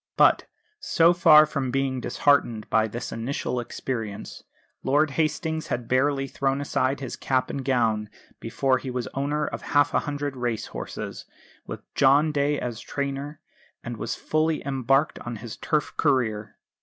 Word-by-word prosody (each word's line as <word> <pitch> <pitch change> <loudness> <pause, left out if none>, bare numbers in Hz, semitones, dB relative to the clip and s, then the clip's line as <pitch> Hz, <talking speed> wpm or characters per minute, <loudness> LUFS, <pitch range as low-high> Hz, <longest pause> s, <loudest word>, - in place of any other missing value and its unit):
But, - - +5 0.3
so 170 +1 +4
far 160 -3 +7
from 140 -4 -2
being 130 0 -1
disheartened 120 -8 +1
by 110 -1 +3
this 115 +3 -6
initial 125 +1 -3
experience, 115 -3 -5 0.4
Lord 145 +3 +2
Hastings 160 +1 -1
had 120 -1 -3
barely 135 +1 +1
thrown 135 0 -1
aside 140 -1 0
his 130 - -5
cap 130 -1 0
and 135 - -4
gown 115 -5 +1 0.3
before 130 -1 0
he 130 - -6
was 125 -2 -3
owner 145 +2 -1
of - - -5
half 145 0 +2
a - - +4
hundred 145 -2 -4
race 120 -3 -2
horses, - - -7 0.4
with - - -7
John 140 +3 +4
Day 145 0 +1
as 120 -3 -4
trainer; 140 +1 -4 0.4
and - - -5
was - - -3
fully 155 0 0
embarked 135 +2 +1
on 120 0 -6
his 110 +1 -8
turf 150 -3 -1
career. 110 -4 0
135 Hz, 155 wpm, -25 LUFS, 125-145 Hz, 0.4 s, far